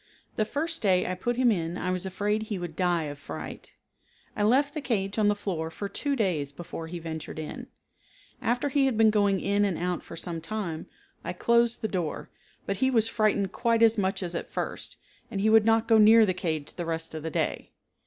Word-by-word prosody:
The 215 - +1
first 320 +7 -2
day 185 -4 +3
I 185 - -1
put 240 +7 -2
him 250 -1 +4
in 170 -3 -2
I 185 - -2
was 185 +1 -2
afraid 205 +3 -1
he 215 -2 -4
would 175 -3 -6
die 175 -2 +1
of 145 -1 -6
fright. - - -8 0.6
I - - -2
left 270 +7 +3
the 305 - -3
cage 205 -5 -1
on 210 - +4
the 205 - +3
floor 175 -6 -3
for 200 +5 -5
two 280 +8 -1
days 170 - 0
before 165 +1 -7
he 175 +2 -6
ventured 160 -2 -6
in. 155 -1 -6 0.7
After 245 +4 0
he 275 0 +3
had 250 -5 0
been 220 -1 +6
going 205 -2 +2
in 200 +2 +1
and 195 -4 0
out 180 0 -2
for - - -10
some 165 0 -5
time, 170 -3 -4 0.4
I - - -3
closed 235 0 +2
the - - +2
door, 175 -7 -3 0.3
but 200 - -2
he 260 - +2
was 225 -3 +2
frightened 210 -4 +1
quite 230 -1 +2
as 225 0 +6
much 195 -1 0
as 175 -1 -3
at 170 - -4
first, - - -3 0.3
and 205 -4 -3
he 215 +2 +3
would 220 -1 +6
not 225 0 +3
go 225 -1 +6
near 220 +1 +8
the 185 - +1
cage 160 -5 -3
the 175 - -5
rest 165 0 -3
of 155 - -5
the 160 - -3
day. - - -2
200 Hz, 220 wpm, -27 LUFS, 175-225 Hz, 0.7 s, near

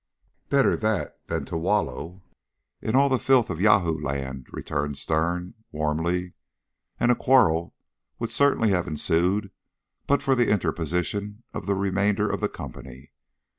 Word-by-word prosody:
"Better 140 -1 +3
that 110 -3 -2
than - - -2
to - - -6
wallow 90 0 -1 0.6
in 110 - -1
all 140 +1 +5
the 130 -2 +1
filth 130 -4 +3
of 80 - -4
Yahoo 100 -6 +4
land," 65 -2 -4
returned 75 -1 -3
Sterne 85 +5 -1 0.2
warmly, 80 +4 -1 0.7
and 120 - +4
a - - +4
quarrel 95 -13 +3 0.4
would - - -4
certainly 140 -6 +3
have 90 -2 0
ensued 90 +5 +1 0.6
but 140 - +2
for 135 - +3
the 120 -3 +2
interposition 100 +3 -1
of - - -6
the 100 - +2
remainder 100 +1 +1
of - - -2
the - - +1
company. 65 -1 -10
90 Hz, 140 wpm, -25 LUFS, 80-110 Hz, 0.7 s, all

